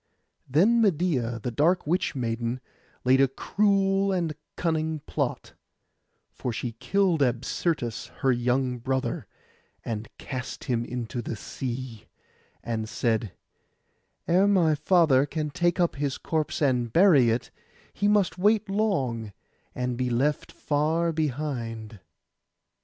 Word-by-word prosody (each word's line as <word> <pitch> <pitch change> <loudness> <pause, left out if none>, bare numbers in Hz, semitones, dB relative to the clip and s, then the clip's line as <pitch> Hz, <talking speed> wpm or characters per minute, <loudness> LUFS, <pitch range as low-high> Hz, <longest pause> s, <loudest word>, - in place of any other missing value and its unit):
Then 205 - +4
Medeia, 150 - +1
the 125 - -2
dark 165 +9 +2
witch 170 +1 0
maiden, 120 0 -2 0.5
laid 130 +2 +5
a 135 - +5
cruel 195 +6 +1
and 175 -4 0
a - - -8 0.2
cunning 160 -2 -1
plot; - - -3 0.8
for 125 - -4
she 115 +2 -3
killed 175 - +1
Absyrtus 125 0 -1
her 135 - +4
young 125 +1 0
brother, 130 +2 -2 0.6
and 110 -1 -4
cast 130 -2 -6
him 120 -2 0
into 120 0 -4
the 115 - -4
sea, 120 0 -6 0.6
and 110 -2 -3
said, 110 -3 -1 0.9
'Ere 185 +4 +4
my 180 -6 +4
father 150 -3 +4
can 150 0 -3
take 175 +4 +1
up 170 -5 +1
his 140 -1 -1
corpse 155 -1 -2
and 125 -4 +1
bury 155 - +6
it, 115 +2 -1 0.4
he 205 - 0
must 205 -4 +2
wait 210 +2 +3
long, 135 - 0 0.4
and 125 -1 -2
be 125 0 0
left 135 +5 0
far 160 +3 0
behind. 120 -8 -3
140 Hz, 125 wpm, -26 LUFS, 120-170 Hz, 0.9 s, bury